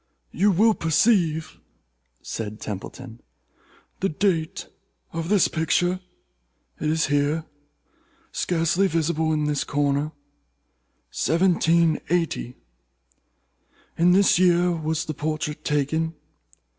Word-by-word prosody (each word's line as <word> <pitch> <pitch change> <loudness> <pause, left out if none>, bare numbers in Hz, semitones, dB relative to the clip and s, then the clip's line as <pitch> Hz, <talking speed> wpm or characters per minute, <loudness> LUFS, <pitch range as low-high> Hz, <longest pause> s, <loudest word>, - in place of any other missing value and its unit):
"You 200 +5 +2
will 215 +4 +4
perceive," 165 -3 +1 0.6
said 110 -1 -5
Templeton, 115 +4 -8 0.8
"the 195 - 0
date 170 +1 -1 0.5
of 165 +1 -4
this 205 -3 +4
picture—it 175 +3 0 0.9
is 160 +1 +1
here, 145 +2 0 0.9
scarcely 175 +2 +1
visible, 160 -2 0
in 155 -1 0
this 150 -1 0
corner—1780. 155 - -1 1.4
In 175 +2 +4
this 195 -2 +4
year 180 -1 +4
was 160 -1 -2
the 155 - -4
portrait 155 0 -3
taken. 160 +3 -1
160 Hz, 85 wpm, -24 LUFS, 150-175 Hz, 1.4 s, will